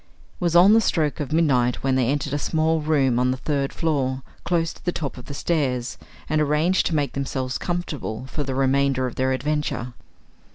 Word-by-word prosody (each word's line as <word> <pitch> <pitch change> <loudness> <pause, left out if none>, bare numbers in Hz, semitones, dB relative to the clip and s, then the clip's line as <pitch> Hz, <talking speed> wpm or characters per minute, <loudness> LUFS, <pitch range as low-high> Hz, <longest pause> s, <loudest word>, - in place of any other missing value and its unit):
It - - -29
was 170 -1 +1
on 185 +4 +8
the 225 - +6
stroke 160 -7 0
of 150 -1 -4
midnight 130 -7 +2
when 135 -1 +2
they 130 -2 +2
entered 145 +1 -1
a 145 - 0
small 160 +1 +1
room 140 -5 +2
on 125 0 +2
the 130 - 0
third 140 0 -1
floor, 135 -5 -1 0.2
close 165 -2 0
to - - -18
the 175 - 0
top 150 -5 -4
of 125 - -11
the 140 - -7
stairs, 130 -7 -1 0.3
and 155 0 +1
arranged 150 +5 +2
to 165 - -1
make 145 -3 0
themselves 130 -2 -3
comfortable 150 -10 -4
for 140 +3 -5
the 135 -2 -3
remainder 135 0 +2
of 125 - -3
their 130 0 0
adventure. 135 -2 -2
140 Hz, 205 wpm, -23 LUFS, 130-160 Hz, 0.3 s, on